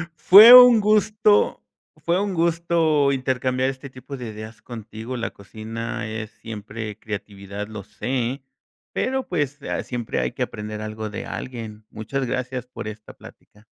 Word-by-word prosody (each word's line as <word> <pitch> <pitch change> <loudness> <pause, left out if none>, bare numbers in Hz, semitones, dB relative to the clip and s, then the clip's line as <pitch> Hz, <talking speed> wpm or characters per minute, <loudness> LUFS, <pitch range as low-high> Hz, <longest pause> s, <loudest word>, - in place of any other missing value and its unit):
Fue 205 +8 +9
un 250 -2 +9
gusto, 210 0 +2 0.4
fue 170 +2 0
un 200 -1 -2
gusto 165 -4 +2
intercambiar 130 -1 0
este 135 +1 -8
tipo 130 +2 -9
de 120 -3 -7
ideas 110 +1 -10
contigo. 115 +1 -8
La 115 -1 -3
cocina 110 +3 -6
es 110 0 -6
siempre 110 -1 -8
creatividad, 100 -1 -7
lo 110 -2 -8
sé, 125 +5 -3 0.5
pero 265 0 -1
pues 145 -4 -2
a - - -3
siempre 120 -3 -4
hay 60 0 -1
que - - -10
aprender 105 0 -6
algo 110 0 -5
de 105 - -6
alguien. 110 -4 -7
Muchas 130 +5 -4
gracias 125 0 -3
por 125 -3 -8
esta 105 0 -9
plática. 105 +1 -17
125 Hz, 150 wpm, -22 LUFS, 110-145 Hz, 0.5 s, Fue